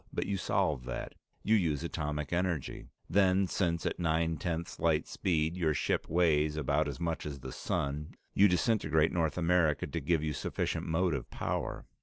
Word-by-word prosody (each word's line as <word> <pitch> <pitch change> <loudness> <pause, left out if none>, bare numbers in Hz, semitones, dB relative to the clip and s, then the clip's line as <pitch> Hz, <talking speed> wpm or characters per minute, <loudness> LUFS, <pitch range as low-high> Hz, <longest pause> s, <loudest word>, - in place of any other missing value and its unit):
But - - -2
you 100 - -1
solve 75 -7 0
that. 60 - -5 0.3
You 110 - +4
use 80 -7 +1
atomic 75 -2 -3
energy. 85 -5 -2 0.2
Then, 95 +1 +3
since 85 -2 -1
at - - -2
nine 80 -1 +1
tenths 85 +1 -3
light 80 -2 +2
speed, 80 -2 0
your 80 -4 +1
ship - - 0
weighs 75 -3 +2
about 75 +1 +1
as 70 -3 -5
much 85 -1 -2
as 70 -3 -6
the - - -6
sun, 75 +2 -3 0.2
you 100 - +6
disintegrate 90 -4 +2
North 80 -3 0
America 85 -4 +2
to 85 - -3
give 75 +2 +1
you 75 -1 -1
sufficient - - -2
motive 80 -5 0
power. - - -3
80 Hz, 170 wpm, -31 LUFS, 75-90 Hz, 0.3 s, you